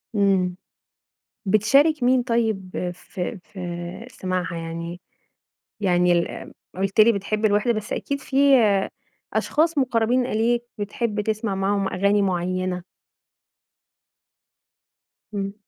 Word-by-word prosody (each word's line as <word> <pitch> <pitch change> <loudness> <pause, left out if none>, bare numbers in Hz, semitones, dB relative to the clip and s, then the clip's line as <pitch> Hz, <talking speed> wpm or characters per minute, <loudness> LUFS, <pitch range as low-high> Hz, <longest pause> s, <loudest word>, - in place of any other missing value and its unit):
إمم، 190 -3 +2 0.9
بتشارك 265 +9 +4
مين 250 0 +4
طيب 215 -7 -1
في 180 +1 -6
في 175 +2 -7
سماعها 185 -2 -3
يعني؟ 170 +1 -6 0.8
يعني 180 -2 +3
ال 170 0 -2 0.2
قلت 195 +3 +1
لي 230 +2 +7
بتحب 210 +2 -2
الوحدة 210 +3 +3
بس 215 -1 -4
أكيد 280 0 -3
في 265 0 -5 1.0
أشخاص 320 0 +1
مقربين 245 -1 +2
إليك 235 +1 +1
بتحب 210 +1 -2
تسمع 215 -1 -1
معاهم 195 0 0
أغاني 200 +2 +2
معينة. 185 0 -1 2.5
إمم. 195 -1 -3
200 Hz, 100 wpm, -23 LUFS, 185-230 Hz, 2.5 s, لي